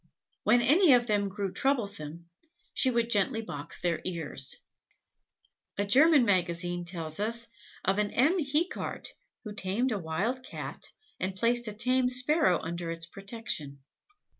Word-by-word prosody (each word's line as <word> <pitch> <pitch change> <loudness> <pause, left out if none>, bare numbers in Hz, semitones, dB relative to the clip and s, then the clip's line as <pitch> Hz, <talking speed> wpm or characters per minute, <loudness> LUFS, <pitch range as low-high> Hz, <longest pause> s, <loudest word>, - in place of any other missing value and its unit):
When 240 0 +5
any 320 +3 +6
of 240 -1 +4
them 205 -3 +1
grew 195 -1 -3
troublesome, 200 - -1 0.5
she 260 - +3
would 235 -1 0
gently 215 +2 +2
box 145 -6 -5
their 170 -2 0
ears. 160 -6 -2 1.2
A 200 - +1
German 275 +5 +6
magazine 175 -2 0
tells 165 -2 -5
us 230 +3 -1 0.4
of 195 +2 +2
a 210 - +3
M. 280 - +2
Hecart, 305 +4 -1 0.3
who 210 -3 -6
tamed 205 +6 -1
a 210 - -1
wild 190 +10 -2
Cat - - -7 0.3
and 185 +1 -2
placed 235 +3 +1
a 215 - -4
tame 250 +3 +2
sparrow 255 - +3
under 170 +1 -4
its 165 0 -4
protection. 195 - -5
205 Hz, 140 wpm, -29 LUFS, 175-250 Hz, 1.2 s, any